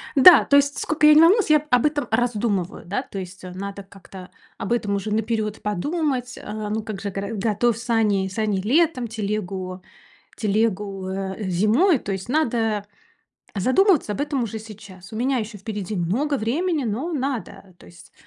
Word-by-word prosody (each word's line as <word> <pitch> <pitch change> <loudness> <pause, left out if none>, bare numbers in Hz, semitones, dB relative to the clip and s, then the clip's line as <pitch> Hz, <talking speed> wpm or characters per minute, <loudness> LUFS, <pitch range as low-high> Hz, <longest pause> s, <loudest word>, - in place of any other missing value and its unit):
Да, 330 +6 +9
то 280 - +3
есть 285 0 +3
сколько 310 -1 +2
я 305 - +9
не 310 - +7
волнуюсь, 380 +2 +5
я 305 - +7
об 250 +2 +3
этом 290 -4 0
раздумываю, 220 -7 -1
да. 200 +8 -2
То 200 -6 -7
есть 185 +1 -9
надо 195 +2 -7
как-то 190 -1 -13 0.3
об 200 - -5
этом 205 -4 0
уже 200 +2 -3
наперёд 220 -1 -1
подумать, 250 - -2
а. 210 0 -5
Ну, 215 0 -2
как 210 -3 -6
же, 200 - -3
горо 200 +3 -4
готов 220 +2 +1
сани 215 -5 +1
сани 205 0 -1
летом, 270 - +2
телегу 200 -4 -4 0.6
телегу, 200 -3 -1
э, 190 +2 -4
зимой. 230 - +3
То 195 - -4
есть 190 +5 -6
надо 225 -8 0 0.7
задумываться 265 - +3
об 205 - -5
этом 285 -3 -1
уже 225 -1 -4
сейчас. 200 -3 -12
У - - -5
меня 260 +3 0
ещё 215 -1 -5
впереди 205 0 -5
много 250 - 0
времени, 295 +7 -1
но 250 +11 -3
надо, 255 - -4
то - - -17
есть. 175 0 -16
215 Hz, 170 wpm, -23 LUFS, 195-260 Hz, 0.7 s, Да